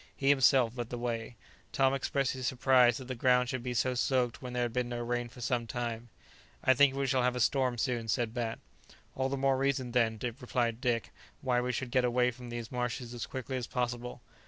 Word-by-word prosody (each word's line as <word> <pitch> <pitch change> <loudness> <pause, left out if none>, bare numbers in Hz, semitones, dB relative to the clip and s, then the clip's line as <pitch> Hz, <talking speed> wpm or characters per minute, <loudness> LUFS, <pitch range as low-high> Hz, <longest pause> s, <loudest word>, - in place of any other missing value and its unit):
He 135 - +1
himself 130 -3 +4
led 120 -2 -4
the 120 - -4
way. 120 -1 -3 0.4
Tom 135 +2 +3
expressed 135 0 0
his 130 -1 -3
surprise 125 -2 +4
that 130 - -8
the 130 - -3
ground 125 0 +3
should 130 -3 -2
be 125 0 -4
so 130 +2 +1
soaked 125 -1 0
when 125 -2 -6
there 125 0 0
had 120 -1 -2
been 125 -1 -1
no 120 - -3
rain 120 0 -2
for 125 - -13
some 120 -1 -1
time. 120 0 -4 0.5
"I 130 - +6
think 135 0 +4
we 140 0 0
shall 130 -1 +2
have 125 0 +1
a - - -2
storm 125 +1 +2
soon," 120 -2 -1
said 115 0 0
Bat, 120 -2 -2 0.6
"All 130 0 0
the 140 - -2
more 135 0 +2
reason, 135 -2 0
then," 115 -2 +2 0.2
replied 120 -2 -1
Dick, 120 -3 0 0.3
"why 125 -3 +1
we 125 +1 -1
should 125 0 -4
get 130 0 +3
away 125 0 +2
from 125 0 -10
these 120 -1 -6
marshes 125 -1 -3
as 120 - -5
quickly 130 0 -4
as 125 - -4
possible. 120 0 -3
125 Hz, 225 wpm, -31 LUFS, 120-130 Hz, 0.6 s, I